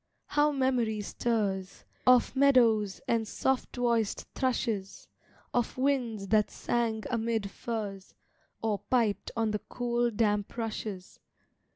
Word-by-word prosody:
how 295 0 +2
memory 255 -6 +1
stirs, 200 -3 -2 0.2
Of 250 +1 +5
meadows 235 -7 +4
and 225 -2 +1
soft 265 +3 -1
voiced 235 -4 0
thrushes 230 -6 -2 0.5
Of 240 0 0
winds 245 -7 0
that 210 0 +3
sang 225 -2 -1
amid 225 -3 -1
firs, 205 -5 -5 0.5
Or 215 -3 0
piped 230 -5 0
on 225 -1 +1
the 210 - -1
cool, 240 +1 -1
damp 210 -1 0
rushes. 215 -4 -5
225 Hz, 110 wpm, -30 LUFS, 210-245 Hz, 0.5 s, Of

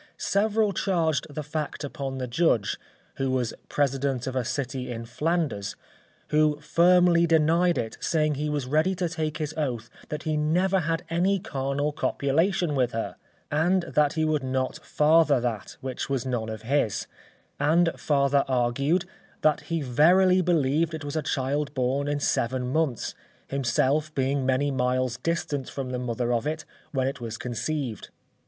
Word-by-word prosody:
Several 210 +1 +1
charged 165 -6 0
the 150 +1 -5
fact 150 +1 -4
upon 135 -1 -4
the 130 - -2
Judge, 120 - +1 0.4
who 135 0 0
was 125 -3 0 0.2
president 135 -2 0
of 130 -1 -4
a 130 - +1
city 130 +1 -3
in 115 -1 -5
Flanders, 145 - -1 0.5
who 150 -1 +3
firmly 170 +2 +4
denied 165 +2 +3
it, 110 -1 -3
saying 155 -2 +1
he 150 +2 -2
was 145 -3 -1
ready 155 +8 +2
to 175 -1 -1
take 155 -2 -3
his 155 -1 -3
oath 120 -7 -2 0.2
that 150 +1 -4
he 155 -1 -1
never 180 +6 +2
had 165 0 -1
any 185 +4 +2
carnal 140 -2 -2
copulation 160 +4 +1
with 125 -3 +1
her, 115 - -3 0.4
and 175 +5 +2
that 150 -3 +2
he 160 -1 +1
would 155 -2 +1
not 130 0 -2
father 150 -2 +4
that, 115 -5 -4
which 130 +1 -4
was 135 -2 -1
none 120 -4 -2
of 110 -1 -6
his; 125 -4 0 0.5
and 165 +4 +3
farther 140 -1 +2
argued, 135 +8 +1 0.4
that 155 -1 +3
he 165 -2 -1
verily 180 +8 +5
believed 160 -1 +1
it 155 -2 -7
was 145 - -4
a 155 - +1
child 140 0 -1
born 130 +2 0
in 145 0 0
seven 125 -1 0
months, 155 -8 0 0.4
himself 140 +3 +1
being 135 0 0
many 135 +2 +2
miles 125 -1 0
distant 150 -4 -2
from 130 -2 -5
the 125 - -2
mother 120 0 -1
of 120 +4 0
it 155 +1 -3 0.3
when 130 -3 0
it 135 -1 -4
was 115 -1 -5
conceived. 125 - -3
145 Hz, 160 wpm, -26 LUFS, 130-160 Hz, 0.5 s, verily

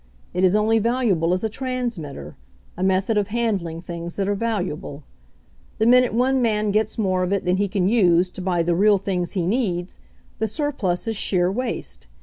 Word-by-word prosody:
It 180 - 0
is 185 +1 +4
only 220 +1 +3
valuable 220 -8 +1
as 185 +2 0
a - - +2
transmitter, 240 - -5 0.4
a - - -7
method 190 +3 +2
of 200 - -1
handling 200 -8 -2
things 170 -1 -6
that 195 -1 -1
are 205 - +1
valuable. 185 -9 -3 0.7
The 220 - +1
minute 250 +1 +5
one 260 +2 +2
man 215 -3 +1
gets 215 +1 0
more 185 -4 +1
of 180 +1 -1
it 200 -1 0
than 180 +1 +2
he 200 +1 +1
can 190 -2 0
use 180 -5 +3
to 185 - -8
buy 180 -2 0
the 170 +1 +1
real 205 +4 +4
things 185 -2 -3
he 180 -4 -1
needs, 185 -4 -1 0.4
the 220 - 0
surplus 225 - -2
is 225 -2 -2
sheer 180 -2 +1
waste. 130 - -4
195 Hz, 190 wpm, -22 LUFS, 180-225 Hz, 0.7 s, minute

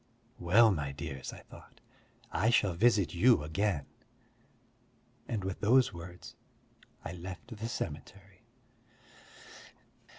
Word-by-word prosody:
"Well, 105 +6 +5
my 75 -6 -2
dears," 70 -3 -6
I - - -11
thought, - - -16 0.5
"I 110 - +2
shall 105 -5 +3
visit 105 0 +3
you 90 -1 +4
again." 80 0 -1 1.4
And 110 -4 -3
with 95 0 -4
those 125 +4 +4
words, 85 +1 -10 0.7
I - - -4
left 90 +7 -8
the 115 +2 -5
cemetery. 95 0 -7
95 Hz, 105 wpm, -31 LUFS, 85-110 Hz, 1.4 s, Well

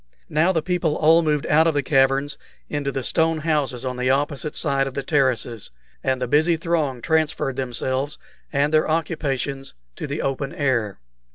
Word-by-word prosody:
Now 160 +5 +3
the 165 -4 0
people 175 -3 0
all 160 +2 +5
moved 150 -2 0
out 160 +2 +4
of 160 - +1
the 145 - +1
caverns 135 +1 +2 0.4
into 145 -2 -1
the 135 -1 -3
stone 160 +3 +1
houses 145 -6 0
on 125 -1 -3
the 125 +1 0
opposite 145 +2 -1
side 140 -3 0
of 135 - -7
the 140 - -2
terraces, 125 -6 0 0.3
and 130 -1 0
the 125 - -2
busy 160 +6 +3
throng 155 -7 -1
transferred 155 -4 0
themselves 130 +2 -2 0.3
and 145 +1 +1
their 155 0 +3
occupations 140 - -2 0.2
to - - -4
the 145 +2 -3
open 135 0 -2
air. 120 -8 0
145 Hz, 175 wpm, -22 LUFS, 135-155 Hz, 0.4 s, all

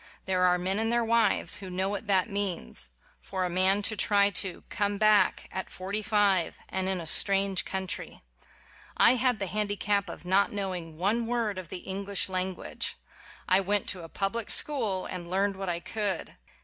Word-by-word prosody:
There 185 -1 0
are 180 0 +4
men 190 +3 0
and 225 +1 0
their 235 0 +2
wives 230 -2 +2
who 190 -2 -7
know 185 +1 -1
what 205 +2 -4
that 190 -2 +3
means: 190 - -3 0.3
for 190 -1 -3
a 180 - -3
man 190 +3 +3
to 220 - +2
try 200 0 +3
to 185 -1 -2
"come 205 -1 0
back" 215 0 +3
at 190 - -5
forty 195 +3 -4
five, 205 -6 +2
and 190 0 -1
in 190 -1 -1
a 170 - -6
strange 195 +3 +1
country! 190 -1 -4 0.7
I - - +7
had 250 -1 +2
the 195 - -2
handicap 205 0 0
of - - -9
not 190 +2 +3
knowing 180 -6 -4
one 220 +6 0
word 230 -5 -1
of 175 -4 -9
the 180 - -7
English 195 0 -1
language. 185 0 -3 0.5
I 185 0 +5
went 200 +1 0
to 185 - -4
a 165 - -9
public 205 +6 -2
school 220 -11 +2
and 175 -1 -6
learned 195 +2 +1
what 190 -1 -4
I 170 -1 -1
could. 205 -1 -3
195 Hz, 185 wpm, -28 LUFS, 185-205 Hz, 0.7 s, I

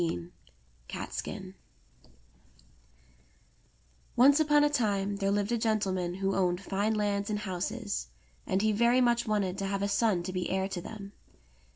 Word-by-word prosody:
CATSKIN - - -5 2.6
ONCE 280 +4 +6
upon 295 -1 +4
a 295 - +4
time 205 -6 0
there 195 -1 0
lived 205 +2 0
a 235 - +1
gentleman 190 -5 0
who 195 0 -1
owned 180 -2 +1
fine 200 +3 -1
lands 205 -1 0
and 210 - 0
houses, 205 - -3 0.4
and 190 +2 +1
he 215 - +3
very 235 +4 +3
much 240 -1 +2
wanted 195 -3 0
to 195 - -1
have 195 0 -1
a - - +1
son 200 -3 +2
to 185 +1 -5
be 180 -1 -2
heir 190 0 0
to 185 -3 -5
them. 200 +1 -8
200 Hz, 150 wpm, -30 LUFS, 195-225 Hz, 2.6 s, ONCE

